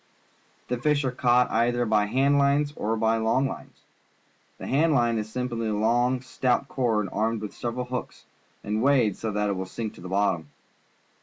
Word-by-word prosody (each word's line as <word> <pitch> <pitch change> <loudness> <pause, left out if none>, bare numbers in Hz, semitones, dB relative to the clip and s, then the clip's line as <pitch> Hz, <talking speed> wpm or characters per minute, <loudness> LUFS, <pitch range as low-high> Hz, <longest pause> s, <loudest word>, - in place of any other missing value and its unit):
The 125 -1 -2
fish 145 +1 +1
are 130 - 0
caught 125 0 +2
either 120 +1 +1
by 105 -2 +2
hand 135 +5 +2
lines 145 +1 +2
or 110 +2 -1
by 110 0 +2
long 115 +5 +1
lines. - - -9 0.8
The - - -8
hand 155 +3 +2
line 120 -3 +2
is 110 0 -6
simply 120 -2 -3
a 105 - -1
long, 120 +4 +1
stout 130 +1 0
cord, 115 -7 0
armed 110 +2 0
with 105 - -6
several 120 +1 -4
hooks, 125 0 -6 0.4
and 105 +1 -1
weighted 125 -7 +3
so 110 - -4
that 105 0 0
it - - +1
will 95 0 -4
sink 110 +2 -5
to - - -14
the 90 - -8
bottom. 95 -6 0
120 Hz, 185 wpm, -26 LUFS, 110-130 Hz, 0.8 s, weighted